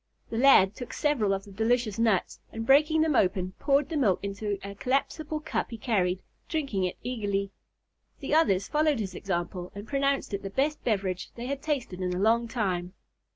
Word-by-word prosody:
The 225 Hz, -, -2 dB
lad 240 Hz, -8 st, +6 dB
took 245 Hz, +3 st, -8 dB
several 265 Hz, -10 st, +1 dB
of 195 Hz, 0 st, -1 dB
the 200 Hz, -, -13 dB
delicious 225 Hz, +1 st, 0 dB
nuts, 220 Hz, -5 st, +1 dB
and 225 Hz, 0 st, -5 dB
breaking 300 Hz, +5 st, +5 dB
them 315 Hz, -3 st, +2 dB
open 185 Hz, -2 st, +2 dB
poured 280 Hz, 0 st, +2 dB
the 325 Hz, -, -3 dB
milk 210 Hz, -10 st, +3 dB
into 200 Hz, +1 st, -3 dB
a 200 Hz, -, -6 dB
collapsible 290 Hz, +7 st, -1 dB
cup 310 Hz, -, -2 dB
he 230 Hz, -, -6 dB
carried, 190 Hz, -5 st, 0 dB, 0.3 s
drinking 275 Hz, -, -1 dB
it 180 Hz, -, -3 dB
eagerly. 200 Hz, -5 st, -2 dB, 0.7 s
The 280 Hz, -, -3 dB
others 200 Hz, -, +3 dB
followed 300 Hz, -3 st, +2 dB
his 195 Hz, -4 st, -3 dB
example, 180 Hz, -1 st, -3 dB
and 205 Hz, +2 st, -8 dB
pronounced 275 Hz, -4 st, 0 dB
it 200 Hz, -, -2 dB
the 195 Hz, -, -5 dB
best 285 Hz, +9 st, -1 dB
beverage 195 Hz, -5 st, -1 dB
they 235 Hz, -, -6 dB
had 275 Hz, +1 st, -3 dB
tasted 250 Hz, -12 st, -3 dB
in 180 Hz, -1 st, -1 dB
a -, -, -2 dB
long 230 Hz, +3 st, +3 dB
time. 185 Hz, -6 st, -2 dB
225 Hz, 190 wpm, -28 LUFS, 195-275 Hz, 0.7 s, lad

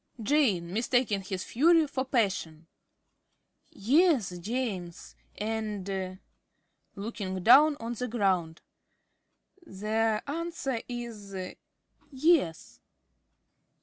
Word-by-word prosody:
~Jane~ 210 Hz, -, +1 dB
(mistaking 230 Hz, -2 st, +1 dB
his 190 Hz, -1 st, -5 dB
fury 325 Hz, +5 st, +4 dB
for 270 Hz, -2 st, -2 dB
passion). 190 Hz, -, -1 dB, 1.0 s
Yes, 260 Hz, -, +2 dB
James. 195 Hz, -5 st, -4 dB, 0.2 s
And 200 Hz, -4 st, -3 dB, 0.8 s
(looking 195 Hz, -3 st, -5 dB
down 285 Hz, +7 st, +7 dB
on 230 Hz, +1 st, -4 dB
the 250 Hz, +2 st, -4 dB
ground) 190 Hz, -8 st, 0 dB, 1.0 s
the 215 Hz, -, -1 dB
answer 290 Hz, -5 st, -3 dB
is 225 Hz, -5 st, -7 dB, 0.7 s
"Yes." 275 Hz, -, +1 dB
220 Hz, 80 wpm, -29 LUFS, 190-260 Hz, 1.0 s, down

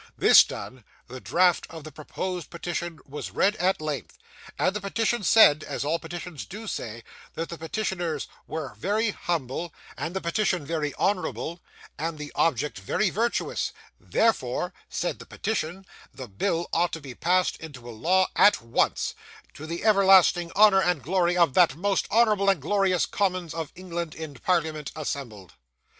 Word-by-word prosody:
This -, -, +8 dB
done, 130 Hz, -2 st, -8 dB, 0.2 s
the 130 Hz, +1 st, -8 dB
draft 180 Hz, -1 st, +2 dB
of 160 Hz, -2 st, -9 dB
the 155 Hz, -, -9 dB
proposed 180 Hz, +3 st, -5 dB
petition 170 Hz, -1 st, -4 dB
was 145 Hz, +2 st, -6 dB
read 205 Hz, +2 st, +2 dB
at 185 Hz, +2 st, +1 dB
length: 150 Hz, -4 st, -5 dB, 0.4 s
and 190 Hz, -, +1 dB
the 210 Hz, -, -2 dB
petition 225 Hz, +4 st, 0 dB
said, 160 Hz, -7 st, +6 dB
as -, -, -4 dB
all 165 Hz, +3 st, 0 dB
petitions 175 Hz, -4 st, -7 dB
DO 215 Hz, +4 st, -8 dB
say, 115 Hz, -, -5 dB, 0.3 s
that 165 Hz, -, -4 dB
the 170 Hz, -, -6 dB
petitioners 170 Hz, -3 st, -3 dB, 0.2 s
were 155 Hz, -6 st, -5 dB
very 210 Hz, -, 0 dB
humble, 165 Hz, -2 st, -3 dB, 0.2 s
and 175 Hz, -, -5 dB
the -, -, 0 dB
petitioned 180 Hz, -2 st, 0 dB
very 150 Hz, -1 st, -2 dB
honourable, 180 Hz, -3 st, -1 dB, 0.4 s
and 160 Hz, +1 st, -3 dB
the 150 Hz, -1 st, -7 dB
object 145 Hz, -7 st, 0 dB
very 180 Hz, -, 0 dB
virtuous; 235 Hz, +3 st, -1 dB, 0.3 s
therefore -, -, 0 dB, 0.2 s
(said -, -, -3 dB
the -, -, -10 dB
petition) 195 Hz, -3 st, -3 dB, 0.3 s
the 130 Hz, -, -9 dB
bill 165 Hz, -, -1 dB
ought 175 Hz, +1 st, +2 dB
to 165 Hz, -, -3 dB
be 135 Hz, -4 st, -9 dB
passed 180 Hz, +7 st, +1 dB
into 140 Hz, -7 st, -10 dB
a -, -, -6 dB
law 185 Hz, +11 st, +2 dB
at 205 Hz, -, +6 dB
once, 115 Hz, 0 st, 0 dB, 0.4 s
to 155 Hz, -, -9 dB
the 170 Hz, +1 st, -5 dB
everlasting 190 Hz, -4 st, +5 dB
honour 205 Hz, -2 st, +6 dB
and 180 Hz, -8 st, 0 dB
glory 175 Hz, +3 st, +1 dB
of 170 Hz, -6 st, +4 dB
that 170 Hz, -5 st, +4 dB
most 195 Hz, +4 st, 0 dB
honourable 210 Hz, -3 st, +4 dB
and 195 Hz, -4 st, +3 dB
glorious 190 Hz, +3 st, +1 dB
Commons 185 Hz, -4 st, -1 dB
of 160 Hz, -2 st, -5 dB
England 170 Hz, -3 st, -5 dB
in 160 Hz, -2 st, -7 dB
Parliament 155 Hz, 0 st, -1 dB
assembled. 125 Hz, -, -6 dB
170 Hz, 160 wpm, -26 LUFS, 150-190 Hz, 0.4 s, This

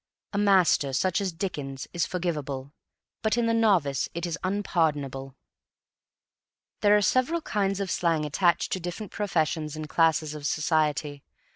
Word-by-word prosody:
A -, -, -1 dB
master, 185 Hz, -9 st, +3 dB
such 185 Hz, +8 st, +1 dB
as 195 Hz, -2 st, -1 dB
Dickens, 145 Hz, -7 st, -5 dB
is 170 Hz, -2 st, 0 dB
forgivable, 150 Hz, -6 st, -3 dB, 0.5 s
but 220 Hz, +1 st, +1 dB
in 240 Hz, -, +2 dB
the 230 Hz, -, +2 dB
novice 185 Hz, -12 st, +2 dB
it 170 Hz, +1 st, -2 dB
is 170 Hz, -2 st, -2 dB
unpardonable. 150 Hz, -9 st, -1 dB, 1.5 s
There 205 Hz, 0 st, +5 dB
are 205 Hz, -, +1 dB
several 255 Hz, -, +2 dB
kinds 195 Hz, -6 st, -1 dB
of 195 Hz, -2 st, -2 dB
slang 165 Hz, -3 st, +1 dB
attached 170 Hz, +4 st, +1 dB
to 185 Hz, -, -1 dB
different 180 Hz, +4 st, -6 dB
professions 160 Hz, -6 st, -1 dB
and 155 Hz, 0 st, -6 dB
classes 160 Hz, -1 st, +2 dB
of 150 Hz, -1 st, -4 dB
society. 150 Hz, -2 st, 0 dB
170 Hz, 145 wpm, -27 LUFS, 150-195 Hz, 1.5 s, There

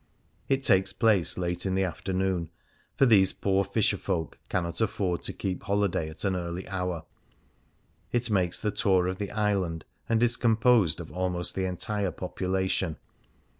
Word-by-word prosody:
It 135 Hz, 0 st, +1 dB
takes 95 Hz, -6 st, +4 dB
place 110 Hz, -7 st, +3 dB
late 90 Hz, -1 st, -2 dB
in 95 Hz, -1 st, -1 dB
the 95 Hz, -, +2 dB
afternoon, 95 Hz, -1 st, -1 dB, 0.5 s
for 135 Hz, -, +5 dB
these 100 Hz, -6 st, +5 dB
poor 100 Hz, 0 st, +1 dB
fisherfolk 95 Hz, -5 st, -1 dB
cannot 85 Hz, 0 st, -1 dB
afford 95 Hz, -5 st, 0 dB
to -, -, 0 dB
keep 95 Hz, -2 st, -4 dB
holiday 100 Hz, -5 st, 0 dB
at 80 Hz, -, -8 dB
an 95 Hz, -1 st, +1 dB
early 85 Hz, +1 st, -4 dB
hour; 90 Hz, -4 st, -3 dB, 1.1 s
it 120 Hz, -1 st, +1 dB
makes 90 Hz, -4 st, +1 dB
the 105 Hz, -, -1 dB
tour 95 Hz, -3 st, +2 dB
of 95 Hz, +1 st, -3 dB
the 100 Hz, -1 st, -3 dB
island, 100 Hz, -6 st, -1 dB, 0.2 s
and 115 Hz, 0 st, +3 dB
it -, -, +7 dB
is 120 Hz, 0 st, +1 dB
composed 115 Hz, -, +3 dB
of 80 Hz, -, -10 dB
almost 90 Hz, -1 st, -2 dB
the 95 Hz, -, -1 dB
entire 100 Hz, +2 st, -1 dB
population. 95 Hz, -1 st, -2 dB
95 Hz, 160 wpm, -28 LUFS, 90-105 Hz, 1.1 s, it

